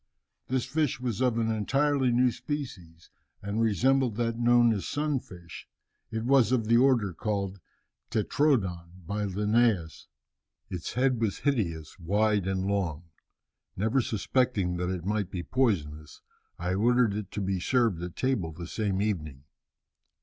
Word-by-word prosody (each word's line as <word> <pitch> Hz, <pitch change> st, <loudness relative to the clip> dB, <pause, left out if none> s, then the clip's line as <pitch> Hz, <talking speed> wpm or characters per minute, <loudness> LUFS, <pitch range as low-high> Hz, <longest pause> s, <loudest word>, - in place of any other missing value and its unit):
This 130 Hz, -1 st, 0 dB
fish 150 Hz, -6 st, 0 dB
was 125 Hz, -2 st, -3 dB
of 125 Hz, -3 st, +2 dB
an 115 Hz, -1 st, +1 dB
entirely 135 Hz, +4 st, +1 dB
new 125 Hz, +1 st, +3 dB
species, 115 Hz, -, -7 dB, 0.3 s
and 100 Hz, +3 st, -1 dB
resembled 125 Hz, +2 st, +2 dB
that 115 Hz, 0 st, -1 dB
known 120 Hz, -1 st, +5 dB
as 100 Hz, -5 st, -4 dB
sun 145 Hz, -1 st, 0 dB
fish, 85 Hz, -6 st, -12 dB, 0.4 s
it 110 Hz, -1 st, -3 dB
was 130 Hz, -3 st, +4 dB
of 120 Hz, -4 st, +2 dB
the 115 Hz, +2 st, +4 dB
order 120 Hz, -7 st, +3 dB
called 100 Hz, +1 st, -3 dB, 0.5 s
'tetrodon' 95 Hz, -, 0 dB
by 105 Hz, +3 st, -2 dB
Linnæus. 105 Hz, -3 st, +1 dB, 0.6 s
Its 90 Hz, -3 st, -5 dB
head 125 Hz, -2 st, +1 dB
was 110 Hz, -4 st, 0 dB
hideous, 95 Hz, -, -1 dB
wide 100 Hz, +2 st, +1 dB
and 95 Hz, -1 st, -1 dB
long. 90 Hz, -5 st, -2 dB, 0.7 s
Never 110 Hz, +7 st, +2 dB
suspecting 110 Hz, -4 st, 0 dB
that 90 Hz, 0 st, -2 dB
it 90 Hz, -2 st, -4 dB
might 105 Hz, -2 st, -1 dB
be 90 Hz, -2 st, -5 dB
poisonous, 75 Hz, -, -1 dB, 0.3 s
I 90 Hz, +1 st, -2 dB
ordered 120 Hz, +2 st, +3 dB
it 105 Hz, -2 st, -4 dB
to 105 Hz, -, -3 dB
be 95 Hz, -1 st, -1 dB
served 115 Hz, -4 st, +1 dB
at 90 Hz, -1 st, -6 dB
table 120 Hz, -11 st, -1 dB
the 85 Hz, +2 st, -8 dB
same 100 Hz, +1 st, -1 dB
evening. 75 Hz, -10 st, -3 dB
105 Hz, 145 wpm, -28 LUFS, 90-125 Hz, 0.7 s, known